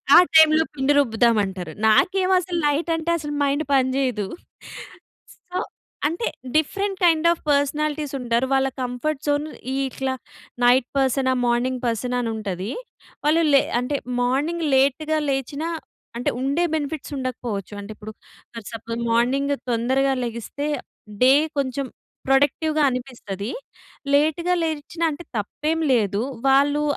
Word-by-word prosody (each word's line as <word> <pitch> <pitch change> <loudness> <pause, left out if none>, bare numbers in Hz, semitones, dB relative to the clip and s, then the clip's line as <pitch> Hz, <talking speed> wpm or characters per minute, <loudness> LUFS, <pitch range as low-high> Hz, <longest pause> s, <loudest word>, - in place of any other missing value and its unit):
ఆ - - +11 0.2
టైంలో 315 0 +7
పిండి 275 +1 +2
రుబ్బుదామంటారు. 215 - +1 0.2
నాకేమో 375 - +3
అసలు 350 -1 -4
నైట్ 300 +4 0
అంటే 325 +1 -1
అసలు 295 -1 -5
మైండ్ 285 +2 +1
పని 260 -1 +3
చేయదు. 245 -7 0 1.3
సో 365 - -1 0.5
అంటే 340 +10 -2 0.3
డిఫరెంట్ 390 +5 0
కైండ్ 330 -1 +4
ఆఫ్ 340 - -5
పర్సనాలిటీస్ 295 +1 0
ఉంటారు. 240 +1 +1
వాళ్ళ 270 0 +2
కంఫర్ట్ 255 +4 -2
జోన్ 290 +1 +1 0.4
ఇట్లా 265 0 -3 0.5
నైట్ 245 +1 +5
పర్సనా? 265 0 +2
మార్నింగ్ 245 +1 0
పర్సనా? 245 +2 -1
అని 230 - -2
ఉంటది. 195 0 -4 0.5
వాళ్ళు 320 +3 +4
లే 275 - +8 0.2
అంటే 280 +3 -1 0.3
మార్నింగ్ 295 +7 0
లేట్‌గా 300 +4 +2
లేచినా 280 +4 -2 0.5
అంటే 240 - 0
ఉండే 280 +6 0
బెనిఫిట్స్ 300 -1 -3
ఉండకపోవచ్చు. 240 -6 -4
అంటే 200 +2 -9
ఇప్పుడు 215 +1 -9 0.4
ఫర్ 230 -3 -7
సపోజ్ 230 +1 -5
మార్నింగ్ 270 +5 +2 0.2
తొందరగా 260 +4 +1
లెగిస్తే 235 +5 -5 0.6
డే 255 +1 +7 0.3
కొంచెం 275 0 -1 0.4
ప్రొడక్టివ్‌గా 290 +3 +2
అనిపిస్తది. 240 -5 -5 0.6
లేట్‌గా 315 +5 +2
లేచినా 320 +1 -3
అంటే 335 +4 -8
తప్పేం 305 +10 -2 0.2
లేదు. 205 -2 +1 0.3
వాళ్ళు 285 +2 +4
270 Hz, 125 wpm, -23 LUFS, 240-305 Hz, 1.3 s, ఆ